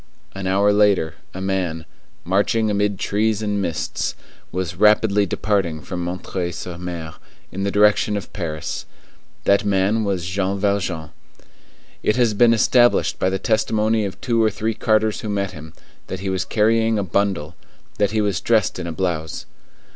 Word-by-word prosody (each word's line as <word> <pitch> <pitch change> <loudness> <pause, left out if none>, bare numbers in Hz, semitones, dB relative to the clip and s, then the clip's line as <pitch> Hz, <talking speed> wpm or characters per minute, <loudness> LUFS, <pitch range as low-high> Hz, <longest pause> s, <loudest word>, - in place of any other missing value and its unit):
An 95 -1 -4
hour 100 +2 +3
later, 100 -6 +3 0.2
a 95 - -7
man, 90 -4 -2 0.4
marching 105 +4 +1
amid 100 -1 0
trees 110 +2 0
and 105 -1 -1
mists, 85 -4 -2 0.4
was 90 -1 -3
rapidly 105 +1 +4
departing 95 -6 0
from 85 +4 -5
M. 90 +1 -3 0.3
sur 90 +1 -6
M. 85 -2 -6 0.4
in 95 - -5
the 100 - 0
direction 105 +1 +3
of 100 - -7
Paris. 80 -6 -4 0.6
That 100 +1 +3
man 100 +2 +1
was 95 -4 -1
Jean 95 +2 -1
Valjean. 95 -6 -1 0.9
It 105 - +1
has 120 -3 +3
been 115 +3 +5
established 120 +2 +3
by 95 - +2
the 95 - -1
testimony 110 +1 +1
of 95 -1 -5
two 115 -2 +1
or 110 - +4
three 110 +2 -2
carters 110 0 +1
who 110 - -5
met 100 -1 -1
him, 80 +1 -10 0.4
that 95 - -5
he 95 -1 -2
was 95 0 -1
carrying 110 +1 +2
a 100 - 0
bundle; 95 -4 -1 0.4
that 100 -1 +3
he 110 +1 0
was 100 -4 0
dressed 110 -5 +1
in 90 - -4
a - - -3
blouse. 80 -3 -3
100 Hz, 165 wpm, -21 LUFS, 90-105 Hz, 0.9 s, been